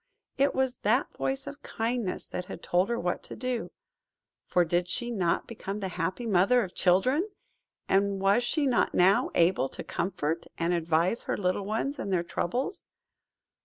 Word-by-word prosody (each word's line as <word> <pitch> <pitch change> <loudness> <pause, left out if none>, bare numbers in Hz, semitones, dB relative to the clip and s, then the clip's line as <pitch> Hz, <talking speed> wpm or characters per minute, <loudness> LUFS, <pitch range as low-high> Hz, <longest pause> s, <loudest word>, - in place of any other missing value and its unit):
It 275 +1 +2
was 265 -2 0
that 235 +7 +1
voice 265 0 -2
of 285 0 -8
Kindness 225 -4 -2
that 180 - -4
had - - -9
told 180 +4 +2
her 235 - 0
what 175 0 -1
to - - -8
do. 250 -1 -3 0.8
For 175 -1 +3
did 175 +2 0
she 240 +6 -1
not 180 -7 0
become 210 -3 -5
the 190 -2 -3
happy 180 +6 -3
mother 225 +4 +4
of 185 - -7
children? 200 - +3 0.6
And 195 0 +2
was 195 +5 +3
she 290 +4 +1
not 255 -3 +2
now 190 +3 +4
able 170 -5 +3
to - - -8
comfort 170 -3 -2
and 170 +1 +1
advise 170 +5 +1
her - - -1
little 185 +1 0
ones 225 +8 -2
in - - -3
their 180 -3 +1
troubles? 250 - -3
195 Hz, 170 wpm, -28 LUFS, 180-245 Hz, 0.8 s, mother